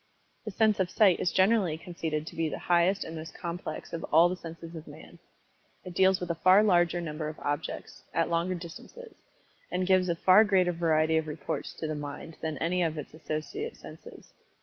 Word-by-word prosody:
The -, -, -3 dB
sense 215 Hz, 0 st, +2 dB
of 185 Hz, -2 st, +1 dB
Sight 195 Hz, -2 st, +4 dB
is 175 Hz, -, 0 dB
generally 190 Hz, -4 st, +3 dB
conceded 160 Hz, -3 st, -4 dB
to -, -, -9 dB
be 165 Hz, -1 st, 0 dB
the -, -, -4 dB
highest 175 Hz, +3 st, +2 dB
and 165 Hz, -, -8 dB
most 160 Hz, -1 st, -8 dB
complex 175 Hz, 0 st, -6 dB
of 165 Hz, -, -4 dB
all 165 Hz, +3 st, +5 dB
the 180 Hz, -, -2 dB
senses 165 Hz, -1 st, -10 dB
of 160 Hz, -1 st, -9 dB
Man. -, -, -13 dB, 0.7 s
It 180 Hz, -, -7 dB
deals 190 Hz, +1 st, +4 dB
with 180 Hz, -1 st, -3 dB
a 165 Hz, -, -6 dB
far 190 Hz, +3 st, +6 dB
larger 175 Hz, -4 st, +3 dB
number 155 Hz, -2 st, -4 dB
of 155 Hz, -, -9 dB
objects 145 Hz, +2 st, -4 dB
at 165 Hz, -, +1 dB
longer 170 Hz, +2 st, 0 dB
distances 180 Hz, -, -10 dB, 0.6 s
and 180 Hz, +1 st, 0 dB
gives 185 Hz, -1 st, +3 dB
a 170 Hz, -, +1 dB
far 185 Hz, +5 st, +6 dB
greater 190 Hz, -4 st, +3 dB
variety 160 Hz, -2 st, +2 dB
of 160 Hz, -1 st, -1 dB
reports 150 Hz, -2 st, -4 dB
to -, -, -6 dB
the 155 Hz, -, -2 dB
mind 145 Hz, +2 st, -7 dB
than 155 Hz, -2 st, -3 dB
any 180 Hz, +4 st, 0 dB
of 160 Hz, -2 st, 0 dB
its 150 Hz, -, -7 dB
associate 160 Hz, -, -5 dB
senses. -, -, -13 dB
170 Hz, 200 wpm, -29 LUFS, 160-185 Hz, 0.7 s, far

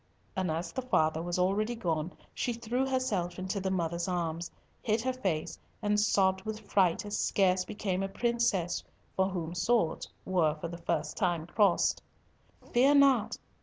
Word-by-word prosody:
and 185 Hz, -2 st, 0 dB
as 165 Hz, +2 st, -2 dB
the 260 Hz, -, -3 dB
father 160 Hz, -10 st, +1 dB
was 175 Hz, +1 st, -2 dB
already 205 Hz, +6 st, +1 dB
gone, 170 Hz, -6 st, -1 dB, 0.2 s
she 245 Hz, -, -1 dB
threw 235 Hz, +3 st, -1 dB
herself 210 Hz, -10 st, -1 dB
into 190 Hz, +2 st, -2 dB
the 190 Hz, 0 st, -1 dB
mother's 170 Hz, -1 st, -1 dB
arms, 170 Hz, -2 st, -2 dB, 0.3 s
hid 220 Hz, -1 st, +1 dB
her 255 Hz, +3 st, -1 dB
face 185 Hz, -11 st, -2 dB, 0.2 s
and 210 Hz, -1 st, +1 dB
sobbed 190 Hz, -2 st, +3 dB
with 215 Hz, +2 st, -5 dB
fright 195 Hz, -1 st, +2 dB
as 205 Hz, -, -3 dB
scarce 185 Hz, -2 st, +2 dB
became 200 Hz, -3 st, -2 dB
a 195 Hz, -, -2 dB
princess 235 Hz, -5 st, 0 dB, 0.3 s
for 190 Hz, 0 st, +2 dB
whom 170 Hz, -3 st, -4 dB
swords 180 Hz, -2 st, +1 dB, 0.2 s
were 170 Hz, -5 st, +2 dB
for 165 Hz, +2 st, -6 dB
the 170 Hz, -, -7 dB
first 170 Hz, -, -2 dB
time 175 Hz, -5 st, 0 dB
crossed. 195 Hz, +1 st, +2 dB, 0.7 s
"Fear 270 Hz, +4 st, +5 dB
not! 275 Hz, -6 st, +4 dB
190 Hz, 165 wpm, -30 LUFS, 175-220 Hz, 0.7 s, Fear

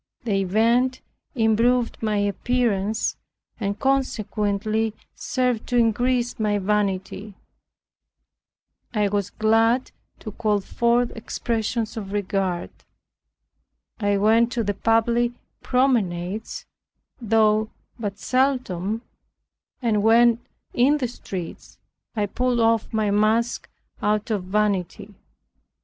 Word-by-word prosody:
The 200 Hz, -4 st, 0 dB
event 235 Hz, +7 st, +2 dB, 0.4 s
improved 230 Hz, +1 st, +2 dB
my 215 Hz, -2 st, 0 dB
appearance, 210 Hz, 0 st, 0 dB, 0.4 s
and 200 Hz, -1 st, -2 dB
consequently 220 Hz, -4 st, 0 dB, 0.2 s
served 250 Hz, -3 st, -1 dB
to 245 Hz, -, 0 dB
increase 240 Hz, +2 st, +1 dB
my 210 Hz, -1 st, +1 dB
vanity. 200 Hz, 0 st, -2 dB, 1.6 s
I 210 Hz, -1 st, +2 dB
was 200 Hz, -1 st, -1 dB
glad 225 Hz, +3 st, +2 dB, 0.3 s
to 215 Hz, -, -6 dB
call 210 Hz, -1 st, 0 dB
forth 235 Hz, +4 st, +1 dB
expressions 225 Hz, 0 st, -3 dB
of 200 Hz, -2 st, -6 dB
regard. 195 Hz, -3 st, -1 dB, 1.3 s
I 205 Hz, -2 st, +1 dB
went 225 Hz, +3 st, +3 dB
to 235 Hz, -, 0 dB
the 205 Hz, -1 st, -1 dB
public 230 Hz, +3 st, +2 dB, 0.3 s
promenades 215 Hz, -6 st, 0 dB, 0.6 s
(though 220 Hz, -1 st, +3 dB, 0.3 s
but 205 Hz, -3 st, -4 dB
seldom) 245 Hz, -6 st, 0 dB, 0.8 s
and 215 Hz, -3 st, +2 dB
when 230 Hz, +2 st, +5 dB, 0.3 s
in 270 Hz, +5 st, +4 dB
the 260 Hz, -4 st, -1 dB
streets, 190 Hz, -7 st, -8 dB, 0.4 s
I 210 Hz, -2 st, +1 dB
pulled 245 Hz, +4 st, 0 dB
off 225 Hz, -1 st, +2 dB
my 215 Hz, -2 st, 0 dB
mask 220 Hz, +3 st, +1 dB, 0.3 s
out 210 Hz, +1 st, 0 dB
of 200 Hz, -4 st, -1 dB
vanity. 205 Hz, 0 st, -1 dB
220 Hz, 100 wpm, -23 LUFS, 205-235 Hz, 1.6 s, when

